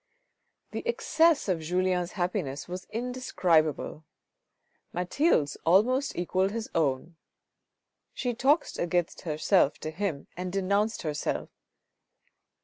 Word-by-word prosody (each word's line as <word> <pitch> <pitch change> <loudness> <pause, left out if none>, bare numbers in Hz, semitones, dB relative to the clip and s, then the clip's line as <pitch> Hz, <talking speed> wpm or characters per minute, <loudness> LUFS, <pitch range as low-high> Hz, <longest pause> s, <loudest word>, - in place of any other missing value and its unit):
The - - -3
excess 330 - +3
of 180 -4 +1
Julien's 180 +2 0
happiness 155 -7 -2
was 180 +1 -6
indescribable. 185 - 0 0.9
Mathilde's 180 - +1
almost 250 - +3
equalled 185 +2 +1
his 225 +2 -4
own. 160 +1 0 0.9
She 245 -2 -2
talked 280 +7 +2
against 175 0 0
herself 155 0 +2
to 155 - -4
him 165 -4 -3
and 180 0 -4
denounced 200 +3 0
herself. 150 -2 -2
180 Hz, 100 wpm, -28 LUFS, 160-220 Hz, 0.9 s, excess